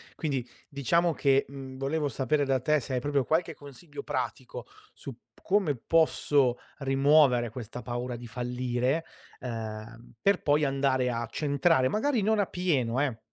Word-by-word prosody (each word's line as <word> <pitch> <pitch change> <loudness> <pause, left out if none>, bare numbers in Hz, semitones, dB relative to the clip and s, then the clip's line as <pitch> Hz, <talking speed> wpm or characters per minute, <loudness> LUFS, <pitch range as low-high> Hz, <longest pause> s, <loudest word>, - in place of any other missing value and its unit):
Quindi, 135 -6 -2 0.2
diciamo 165 +4 +1
che, 140 -2 +2
mhmm, 135 -1 -9
volevo 145 +3 -1
sapere 145 +2 0
da 135 -1 +1
te 150 +3 +2
se 130 0 -6
hai 125 - +1
proprio 145 +1 0
qualche 165 +2 0
consiglio, 145 +1 -10
pratico 125 -2 -4 0.3
su 140 - -9
p 120 - -25 0.2
come 190 -7 +2
posso 145 -2 +2 0.2
rimuovere 135 -3 +4
questa 120 +1 -7
paura 120 0 -4
di 120 0 -9
fallire, 125 +5 -1 0.4
ehm, 115 -1 -7
per 200 -2 +3
poi 150 +1 +2
andare 135 -2 +1
a 115 0 -3
centrare, 140 0 +2
magari 235 - +1
non 215 +2 +2
a 205 - +3
pieno 140 -10 0
eh, 130 -6 -1
135 Hz, 155 wpm, -28 LUFS, 125-150 Hz, 0.4 s, rimuovere